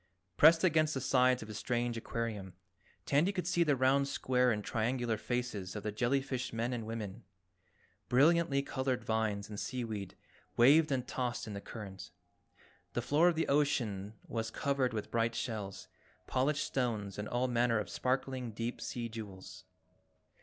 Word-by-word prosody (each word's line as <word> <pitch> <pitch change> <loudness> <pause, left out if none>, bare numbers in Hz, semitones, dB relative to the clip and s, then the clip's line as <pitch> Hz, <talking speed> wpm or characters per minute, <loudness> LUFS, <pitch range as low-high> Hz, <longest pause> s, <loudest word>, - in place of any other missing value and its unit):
Pressed 160 - +7
against 155 -4 +3
the - - 0
sides 125 -1 +3
of - - -10
his 105 -1 -6
strange 120 -1 -1
aquarium, 110 -5 -4 0.5
Tandy 150 +7 +3
could 185 -4 -3
see 175 -1 +3
the 150 -4 +2
round, 135 +2 +3
square 125 -2 +2
and 105 -2 -1
triangular 120 +1 0
faces 110 -5 -3
of 105 - -5
the 105 - -2
jellyfish 130 +3 -1
men 115 +2 -1
and 115 -3 -4
women. 110 -4 -5 0.9
Brilliantly 145 +1 +4
colored 130 -2 -2
vines 110 -2 -1
and 105 -1 -6
seaweed 110 -7 -4 0.4
waved 145 +6 +6
and 125 -2 -1
tossed 125 -2 -2
in 110 - -6
the 100 - -5
current, 95 -5 -8 0.8
the 120 - 0
floor 150 +7 +4
of 175 - +3
the 165 - 0
ocean 110 -8 0
was 115 -1 -2
covered 135 +1 0
with 110 -2 -4
bright 115 0 +1
shells, 105 -5 -4 0.4
polished 140 +3 +1
stones 110 -7 -2
and 105 - -3
all 125 +1 +1
manner 120 -1 +2
of 105 -3 -2
sparkling 130 +3 -2
deep 115 +3 -4
sea 120 -1 -3
jewels. 95 -4 -9
120 Hz, 160 wpm, -33 LUFS, 110-135 Hz, 0.9 s, Pressed